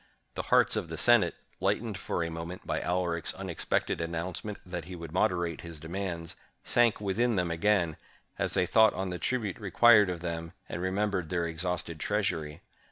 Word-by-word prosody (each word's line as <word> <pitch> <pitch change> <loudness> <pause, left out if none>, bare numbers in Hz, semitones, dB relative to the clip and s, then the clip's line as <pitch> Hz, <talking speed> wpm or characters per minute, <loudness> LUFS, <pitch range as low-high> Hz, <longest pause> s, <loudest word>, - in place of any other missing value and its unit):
The - - -2
hearts - - +5
of - - -2
the - - -5
Senate, - - +5 0.2
lightened 105 +3 0
for 90 -2 -2
a 85 - -3
moment 85 +2 -6
by - - -1
Alaric's 85 -2 -1
unexpected 95 -3 -1
announcement 85 +5 -4
that 90 -3 -5
he 90 +1 -7
would 85 -2 -8
moderate 85 -4 0
his 85 -2 -9
demands, 85 0 -4 0.3
sank 120 -2 +3
within 110 +4 +1
them 90 -3 0
again, 85 -2 +2 0.4
as - - 0
they 90 - +3
thought 110 +4 +5
on 95 0 -2
the 90 - -4
tribute 110 -8 -2
required 105 0 +6
of 90 -2 -4
them, 85 -1 -4
and 85 - -5
remembered 95 -2 -1
their 85 0 0
exhausted 85 0 -3
treasury. 85 -8 -1
90 Hz, 170 wpm, -29 LUFS, 85-100 Hz, 0.4 s, required